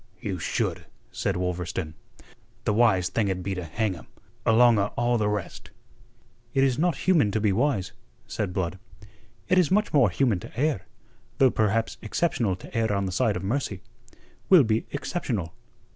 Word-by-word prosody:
"You 95 -2 -4
should," 80 - -2 0.2
said - - -2
Wolverstone. 90 -2 -3 0.7
"The 105 - +1
wise 105 -5 +3
thing'd 95 -5 -1
be 100 - -2
to 90 -1 -4
hang 105 +5 -1
him, 80 -8 -12 0.4
along 115 0 +5
o' 100 - +2
all 120 0 +2
the 105 -1 +1
rest." 105 -2 -4 0.9
"It 135 - +4
is 135 0 +1
not 175 0 +1
human 165 - +4
to 110 - -1
be 105 -1 +2
wise," 120 -4 0 0.3
said 100 -3 -3
Blood. 95 -1 -3 0.7
"It 185 +1 +4
is 175 - +3
much 210 +3 +1
more 135 -8 +5
human 110 0 +1
to 110 - -9
err, 140 -10 0 0.5
though 130 -2 +5
perhaps 110 +1 0
exceptional 115 - 0
to 90 - -13
err 110 -2 +1
on 100 -1 0
the 95 - -3
side 105 +2 +1
of 90 - -4
mercy. 100 -3 -2 0.7
We'll 180 -6 +8
be 110 -1 0
exceptional. 125 - -3
110 Hz, 170 wpm, -26 LUFS, 95-130 Hz, 0.9 s, We'll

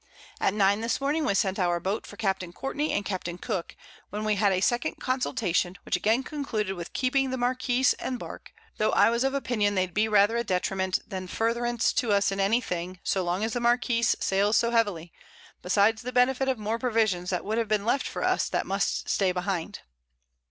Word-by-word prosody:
At 195 - +1
9 200 +1 +3
this 230 +1 -1
Morning, 295 +3 0
we 200 - +1
sent 195 -1 +1
our 175 -2 +1
Boat 195 +5 -3
for - - -11
Capt. 195 -4 0
Courtney 290 +3 -2
and 205 - -1
Capt. 185 -3 -3
Cooke, 170 -1 -4 0.3
when 210 +2 -4
we 215 - +2
had 200 0 +2
a 185 - +1
second 240 +5 0
Consultation, 205 -8 -1
which - - 0
again 225 +5 +1
concluded 245 -10 -3
with 175 -2 -7
keeping 270 +1 +1
the 260 - -2
Marquiss 250 +1 +2
and 255 - -3
Bark: - - -9 0.3
Tho' 215 - +2
I - - +5
was 235 +2 +1
of 270 +1 0
Opinion, 215 -7 0
they'd 185 -2 0
be 215 +3 +2
rather 210 +1 +4
a 235 - 0
Detriment 190 -1 -1
than 185 -1 -5
Furtherance 235 +3 0
to 240 -6 0
us 200 0 +2
in 195 - -3
any 210 +5 +3
thing, 180 -2 -5
so 190 - 0
long 180 +3 -1
as 220 0 -1
the 245 - -1
Marquiss 240 -1 +2
sails 200 +3 +2
so 235 - +2
heavily, 200 -8 0 0.5
besides 205 +4 +2
the 250 +1 -5
Benefit 255 +2 +2
of 260 - 0
more 215 +2 -2
Provisions 220 -8 +1
that 180 -2 -2
would 220 +3 0
have 230 - -1
been 210 -1 0
left 270 +4 +1
for - - -4
us - - +1
that - - -1
must - - -1
stay 190 -2 +2
behind. 180 -2 -3
215 Hz, 210 wpm, -27 LUFS, 190-240 Hz, 0.5 s, I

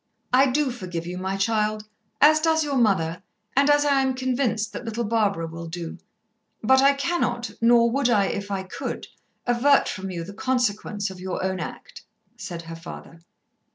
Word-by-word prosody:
"I 265 +2 +6
do 275 +1 +1
forgive 180 -8 -5
you, 180 +1 -5
my 190 +1 -2
child, 215 +1 0 0.3
as 310 +1 +7
does 320 0 +2
your 280 -3 0
mother, 180 -7 +1 0.3
and 280 +2 +4
as 290 0 +4
I 280 -2 +3
am 265 -1 0
convinced 250 -4 -1
that - - -6
little 230 0 -3
Barbara 205 -6 +1
will 165 +1 -7
do. 170 0 -6 0.6
But 265 +4 +5
I 275 +1 +6
cannot, 275 -5 -1
nor 235 0 +5
would 270 0 +1
I 205 -4 +4
if 200 +1 -3
I 195 -1 -2
could, 185 - -5 0.4
avert 260 +4 +4
from 190 +1 -4
you 175 -2 -4
the 200 +4 -9
consequence 215 -4 -1
of 185 - -10
your 185 0 -4
own 190 0 -1
act," 160 - -8 0.3
said 180 -6 -7
her 165 0 -8
father. 165 0 -10
220 Hz, 180 wpm, -24 LUFS, 185-260 Hz, 0.6 s, as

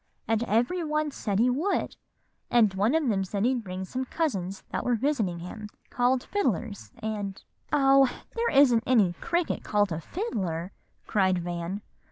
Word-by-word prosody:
And 225 0 +1
every 240 - +1
one 305 -1 0
said 205 -7 -2
he 245 +4 +4
would; 320 +11 -1 0.5
and 225 -5 +4
one 205 +9 +2
of 320 -4 +2
them 195 -4 +1
said 200 +2 -1
he'd 250 -2 +1
bring 185 -1 -5
some 260 +7 -3
cousins 195 - -2
that - - -2
were 245 - +2
visiting 225 -8 0
him, 210 +5 -7 0.2
called 250 0 +2
fiddlers, 225 - -2
and" 205 -3 -3 0.3
"Oh! 275 -2 +5 0.3
there 470 0 +1
isn't 270 -5 +5
any 215 -9 +4
cricket 345 -1 -1
called 205 -2 +1
a 160 0 -3
fiddler," 185 - -3 0.3
cried 190 -3 +2
Van. 175 +3 -4
225 Hz, 160 wpm, -27 LUFS, 190-270 Hz, 0.5 s, Oh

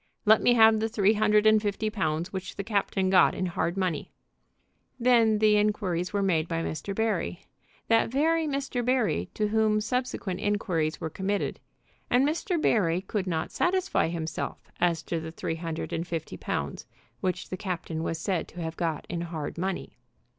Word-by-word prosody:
"Let 220 +1 +6
me 245 - +4
have 220 -1 +6
the 220 +1 0
three 210 -1 +3
hundred 210 0 +3
and 215 0 +6
fifty 210 +1 -1
pounds 170 -3 -2
which 190 0 -5
the 200 - -4
captain 195 -2 0
got 185 - +5
in 185 - -1
hard 175 0 -1
money." 180 -6 -1 0.9
Then 235 -3 +4
the 210 0 +4
inquiries 200 -4 0
were 200 -1 0
made 170 -4 +1
by 165 -1 -2
Mr. 195 +6 -4
Barry, 210 -6 -1 0.4
that 225 0 +3
very 320 +5 +2
Mr. 275 -3 -2
Barry 230 - +1
to 210 -1 0
whom 215 0 +2
subsequent 215 -4 -2
inquiries 185 -7 0
were 160 - -4
committed, 195 +4 -2 0.5
and 255 +3 +4
Mr. 340 +3 -1
Barry 180 - +2
could 195 0 -3
not 160 -3 -2
satisfy 375 - +1
himself 160 -1 -5
as 170 -3 +1
to 165 - -2
the 160 0 -6
three 165 0 -4
hundred 165 -1 -4
and 165 +1 -2
fifty 165 -2 -4
pounds - - -4 0.3
which 185 -2 -2
the - - -3
captain 180 -5 -4
was 165 0 -2
said 175 +1 -1
to 175 - -11
have 165 -1 -4
got 165 -3 -2
in 170 -1 -3
hard 165 -4 -5
money. 190 +2 -4
195 Hz, 175 wpm, -27 LUFS, 170-220 Hz, 0.9 s, Let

